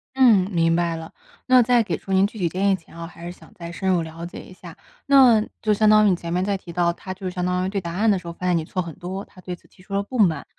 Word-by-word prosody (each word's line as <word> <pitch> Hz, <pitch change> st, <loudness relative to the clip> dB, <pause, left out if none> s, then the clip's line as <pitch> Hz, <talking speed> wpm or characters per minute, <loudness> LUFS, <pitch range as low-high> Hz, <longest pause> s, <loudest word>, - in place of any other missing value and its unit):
嗯， 225 Hz, -8 st, +5 dB
明 165 Hz, -1 st, +2 dB
白 170 Hz, -1 st, 0 dB
了。 160 Hz, 0 st, -8 dB, 0.4 s
那 255 Hz, -1 st, +6 dB
在 240 Hz, 0 st, +3 dB
给 215 Hz, -, -2 dB
出 195 Hz, -, -6 dB
您 190 Hz, +1 st, +4 dB
具 220 Hz, -, -13 dB
体 180 Hz, -, 0 dB
建 190 Hz, +4 st, 0 dB
议 195 Hz, -, +3 dB
前 170 Hz, -2 st, -16 dB
哦， 170 Hz, 0 st, -6 dB
还 170 Hz, 0 st, -12 dB
是 175 Hz, -, -5 dB
想 -, -, -16 dB
再 170 Hz, -1 st, -8 dB
深 190 Hz, +2 st, -3 dB
入 175 Hz, -3 st, +2 dB
了 165 Hz, +1 st, -9 dB
解 175 Hz, -, -9 dB
一 185 Hz, -, -14 dB
下， 175 Hz, -3 st, -13 dB, 0.3 s
那 260 Hz, -6 st, +6 dB, 0.2 s
就 215 Hz, -1 st, +2 dB
相 215 Hz, +1 st, +3 dB
当 215 Hz, 0 st, +6 dB
于 205 Hz, -, +5 dB
你 180 Hz, -, +2 dB
前 170 Hz, -1 st, -7 dB
面 180 Hz, +2 st, 0 dB
在 200 Hz, -, 0 dB
提 185 Hz, -3 st, -9 dB
到， 170 Hz, 0 st, +1 dB
他 185 Hz, +2 st, -8 dB
就 185 Hz, -1 st, -5 dB
相 180 Hz, 0 st, -4 dB
当 180 Hz, 0 st, 0 dB
于 -, -, -2 dB
对 195 Hz, -1 st, -3 dB
答 170 Hz, -1 st, -6 dB
案 215 Hz, +4 st, +1 dB
的 195 Hz, -, +2 dB
时 175 Hz, -, -12 dB
候 170 Hz, -, -5 dB
发 180 Hz, -, -7 dB
现 180 Hz, -, +2 dB
你 165 Hz, -, 0 dB
错 185 Hz, +4 st, -5 dB
很 170 Hz, -3 st, -7 dB
多， 185 Hz, +2 st, -6 dB
他 185 Hz, -, -18 dB
对 180 Hz, -1 st, -6 dB
此 -, -, -25 dB
提 185 Hz, -, -22 dB
出 195 Hz, +1 st, -11 dB
了 200 Hz, -, 0 dB
不 250 Hz, +4 st, -6 dB
满。 175 Hz, -7 st, +2 dB
185 Hz, 345 characters per minute, -22 LUFS, 170-200 Hz, 0.4 s, 那